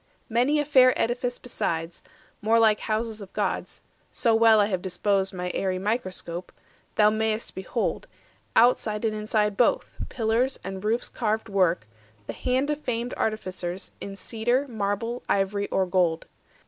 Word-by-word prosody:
Many 250 +6 +2
a 295 - 0
fair 255 -3 +5
edifice 245 +1 0
besides, 165 -8 -3 0.4
more 220 +2 +3
like 220 -2 +4
Houses 220 0 -2
of 195 - -10
gods—so 230 -3 -2
well 225 -1 +6
I 205 - +5
have 190 -3 -2
disposed 195 +1 0
My 180 -1 -4
aerie 185 -1 -1
microscope—thou 190 0 -2
may'st 220 0 -1
behold, 190 - -2 0.5
Outside 225 -2 +3
and 220 - +1
inside 210 -1 0
both, 240 - +1
pillars 235 +2 0
and 190 +1 -6
roofs 225 +3 0
Carved 220 -1 -2
work, 185 - +2 0.4
the - - -5
hand 260 +3 0
of 300 0 -3
famed 240 -2 -2
artificers 185 -4 -3
In 200 0 -6
cedar, 240 +7 -1
marble, 225 +1 -2
ivory, 200 +1 +1
or 190 - +1
gold. 180 -3 +1
215 Hz, 140 wpm, -26 LUFS, 195-235 Hz, 0.5 s, well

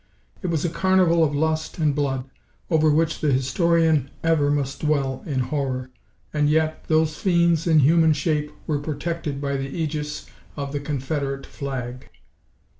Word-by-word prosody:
It 185 - -3
was 165 -2 0
a - - +1
carnival 180 -1 +3
of 145 -2 +1
lust 155 +1 -1
and 155 -3 +2
blood, 135 -2 -1 0.4
over 155 -1 +4
which 155 +1 +1
the 150 - +2
historian 155 +2 +2
ever 160 -3 +3
must 140 -1 -1
dwell 140 -4 0
in 135 -4 0
horror. 130 -2 -2 0.4
And 150 -1 +2
yet, 155 0 +1
these 155 -1 +2
fiends 170 -2 +2
in 160 -2 +5
human 160 +3 +5
shape 150 0 -1
were 150 -2 0
protected 150 0 -3
by 140 -1 -1
the 135 0 -4
ægis 150 -1 -4 0.3
of 140 -1 -4
the 145 - -2
"Confederate" 140 -1 -3
flag! 130 -2 -6
150 Hz, 155 wpm, -23 LUFS, 140-160 Hz, 0.4 s, in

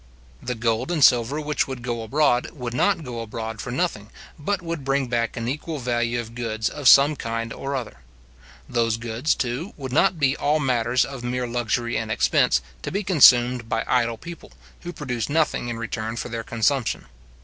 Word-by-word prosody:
The 125 - -3
gold 115 +3 -1
and 165 -5 +1
silver 125 +4 +4
which 150 0 -1
would 130 -3 -6
go 120 -2 -3
abroad 125 +2 +1
would 125 -4 -5
not 165 +7 +1
go 120 -4 -6
abroad 110 0 -5
for - - -6
nothing, 120 - -2 0.3
but 200 +6 -1
would 165 -4 -4
bring 135 0 +1
back 120 -1 -1
an 115 0 -3
equal 150 +4 -3
value 120 -2 -1
of 115 -1 -7
goods 110 -2 -2
of 145 -3 -2
some 140 +3 +7
kind 115 -2 -4
or 140 +1 -4
other. 120 - -5 0.7
Those 115 -2 0
goods, 120 +5 -1
too, 130 +9 -3
would 130 -3 -6
not 165 +4 +3
be 140 -2 +2
all 150 +2 +1
matters 125 -3 +1
of 135 -3 -8
mere 125 +1 -2
luxury 120 0 -1
and 110 -1 -4
expense, 65 - +3 0.2
to - - -4
be 200 +3 -1
consumed 125 - +5
by 115 - 0
idle 115 -2 +1
people, 170 +6 -10 0.3
who 175 - -7
produce 125 -8 -4
nothing 155 -5 +1
in 115 - -4
return 115 -1 -4
for 120 - -4
their 115 -1 -4
consumption. 115 +3 0
125 Hz, 190 wpm, -23 LUFS, 115-140 Hz, 0.7 s, some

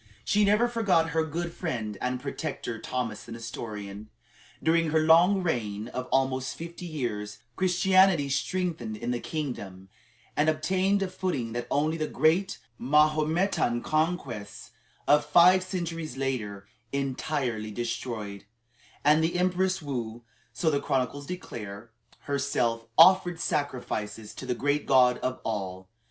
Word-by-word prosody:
She 205 - +3
never 210 +4 +4
forgot 195 -9 +2
her 160 +1 +2
good 165 +2 -4
friend 115 - -3
and 125 0 -1
protector, 135 -4 -4
Thomas 120 -4 -3
the 115 - -9
Nestorian. 110 -3 -7 0.5
During 165 0 +3
her 160 +1 +3
long 175 +5 +5
reign 110 - -2
of 125 0 -5
almost 130 0 +1
fifty 170 +1 -7
years, 110 -9 -4 0.2
Christianity 185 -3 +4
strengthened 140 - -2
in 120 +3 -3
the 120 - -1
kingdom, 100 - -5 0.5
and 150 +2 +3
obtained 185 +6 +1
a - - -1
footing 180 -11 -3
that 120 0 -3
only 155 +3 +1
the 155 -1 -1
great 165 +7 +2 0.2
Mahometan 150 -1 +2
conquests 155 - -2 0.4
of 150 0 +5
five 175 +5 +6
centuries 165 -6 -4
later 110 -7 -3 0.3
entirely 135 -4 -2
destroyed; 110 -3 -4 0.6
and 150 +2 +5
the 170 +2 0
Empress 185 0 +1
Woo, 120 -4 -4 0.3
so 160 -3 0
the 140 - 0
chronicles 135 +2 -1
declare, 115 - -7 0.3
herself 125 -5 -1
"offered 180 -2 +6
sacrifices 120 - -3
to 130 - -8
the 125 - 0
great 145 +4 0
God 125 -2 +5
of 130 0 -2
all." 95 -4 -4
145 Hz, 130 wpm, -28 LUFS, 115-170 Hz, 0.6 s, five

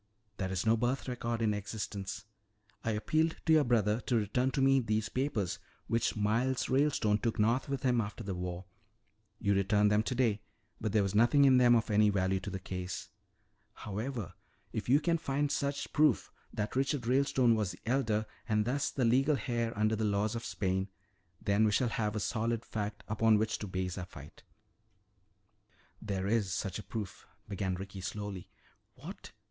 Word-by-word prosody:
There 95 -1 -2
is 95 +1 -2
no 110 +1 +5
birth 125 +4 -1
record 120 -2 -2
in 105 -1 +2
existence. 105 -1 -5 0.6
I - - -1
appealed 155 +9 +1
to 160 - +4
your 155 -1 +6
brother 115 -3 +2
to 125 - +2
return 115 +4 +1
to 135 - -2
me 135 0 +5
these 110 -3 -1
papers 125 -9 -1 0.3
which 115 0 0
Miles 115 +5 +1
Ralestone 130 -6 +2
took 115 0 -1
north 115 +6 +2
with 140 -1 -3
him 125 -3 +3
after 105 +2 -6
the 100 -2 -3
war. 90 0 -5 0.7
You 100 -2 +1
returned 105 +1 +3
them 105 0 +4
today 115 -3 0 0.4
but 110 - -2
there 105 -1 +3
was 100 0 -2
nothing 120 +7 +5
in 130 -2 +6
them 120 -1 +6
of 115 0 +1
any 105 0 +5
value 95 -1 +1
to 95 - -6
this 95 -1 -6
case. 90 -1 -5 0.6
"However, 105 -2 -5 0.4
if - - -4
you 140 +3 +6
can 165 +1 +1
find 145 -1 -1
such 140 0 -2
proof, 150 -5 +3 0.2
that 105 +2 -3
Richard 135 -1 0
Ralestone 130 -1 +3
was 105 -4 0
the 90 - -13
elder 115 -3 +1 0.2
and 105 -1 +2
thus 140 +5 0
the 130 - 0
legal 135 +5 +3
heir 120 -3 0
under 110 +1 +2
the 110 - -2
laws 105 0 +1
of 115 0 -4
Spain, 95 0 -1 0.5
then 100 +2 +2
we 110 - +4
shall 125 +3 +2
have 105 -2 -1
a - - 0
solid 115 +2 -1
fact 105 -1 -4
upon 110 0 +3
which 110 +1 -1
to 105 - -5
base 95 0 -3
our 90 - -4
fight." 75 -5 -13 1.6
"There 95 -3 -3
is 105 -2 +1
such 95 +3 -3
a - - -7
proof," 100 -6 -6 0.2
began 95 -2 -2
Ricky 95 +1 -7
slowly. 100 -1 -5 0.5
"What? - - -10
110 Hz, 180 wpm, -32 LUFS, 100-125 Hz, 1.6 s, your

